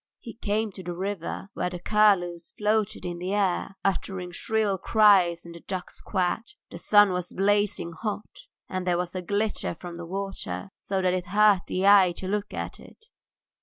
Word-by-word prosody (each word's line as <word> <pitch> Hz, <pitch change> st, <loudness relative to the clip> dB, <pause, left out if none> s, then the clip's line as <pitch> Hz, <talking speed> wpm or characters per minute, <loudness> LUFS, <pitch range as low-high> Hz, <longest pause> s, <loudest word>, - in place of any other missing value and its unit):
He 230 Hz, -, -9 dB
came 215 Hz, -1 st, -1 dB
to 190 Hz, -, -9 dB
the 175 Hz, -1 st, -5 dB
river, 195 Hz, 0 st, -4 dB
where 180 Hz, -, -1 dB
the 180 Hz, -, -6 dB
curlews 180 Hz, -3 st, +2 dB
floated 210 Hz, -2 st, 0 dB
in 175 Hz, -1 st, -4 dB
the 185 Hz, +3 st, -2 dB
air 195 Hz, -1 st, 0 dB
uttering 190 Hz, -2 st, -2 dB
shrill 205 Hz, +1 st, 0 dB
cries 190 Hz, -6 st, +4 dB
and 170 Hz, -, -9 dB
the 170 Hz, -, -10 dB
ducks 185 Hz, +1 st, -6 dB
quacked. 195 Hz, -, -2 dB, 0.2 s
The 170 Hz, -, -7 dB
sun 205 Hz, +1 st, +5 dB
was 180 Hz, -1 st, -2 dB
blazing 205 Hz, -2 st, +1 dB
hot, 215 Hz, -, -6 dB, 0.2 s
and 185 Hz, -1 st, -4 dB
there 175 Hz, -1 st, +2 dB
was 180 Hz, 0 st, -3 dB
a 185 Hz, -, -3 dB
glitter 205 Hz, 0 st, -1 dB
from 175 Hz, 0 st, -8 dB
the 170 Hz, -, -7 dB
water, 195 Hz, -, -5 dB
so 190 Hz, -1 st, -2 dB
that 180 Hz, -1 st, +2 dB
it 180 Hz, -1 st, -2 dB
hurt 205 Hz, -1 st, +4 dB
the 185 Hz, +1 st, -1 dB
eyes 195 Hz, -3 st, +6 dB
to 185 Hz, -, -5 dB
look 205 Hz, +1 st, -2 dB
at -, -, -5 dB
it. 445 Hz, -, -16 dB
190 Hz, 185 wpm, -26 LUFS, 180-205 Hz, 0.2 s, eyes